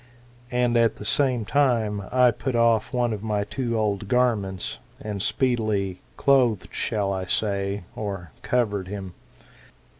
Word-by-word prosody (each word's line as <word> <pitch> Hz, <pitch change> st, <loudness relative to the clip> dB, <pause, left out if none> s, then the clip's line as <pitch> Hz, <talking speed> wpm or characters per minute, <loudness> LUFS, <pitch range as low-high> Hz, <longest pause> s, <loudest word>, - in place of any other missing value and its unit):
And 125 Hz, -1 st, +2 dB
at 115 Hz, -1 st, +3 dB
the 105 Hz, -, -9 dB
same 125 Hz, -1 st, +1 dB
time 115 Hz, -7 st, +2 dB
I 125 Hz, -1 st, +5 dB
put 130 Hz, +1 st, -3 dB
off 115 Hz, -1 st, +3 dB
one 120 Hz, -3 st, +1 dB
of 105 Hz, -, -5 dB
my 105 Hz, -2 st, 0 dB
two 115 Hz, +2 st, -2 dB
old 105 Hz, -2 st, -1 dB
garments, 105 Hz, -6 st, 0 dB, 0.2 s
and 105 Hz, -2 st, -4 dB
speedily 110 Hz, -7 st, 0 dB, 0.2 s
—clothed, 125 Hz, -7 st, +3 dB
shall 100 Hz, -2 st, -1 dB
I 95 Hz, -1 st, -3 dB
say, 100 Hz, 0 st, -1 dB
or 95 Hz, -6 st, -5 dB
covered 105 Hz, -6 st, 0 dB
him 95 Hz, -2 st, -6 dB
110 Hz, 140 wpm, -25 LUFS, 100-125 Hz, 0.2 s, I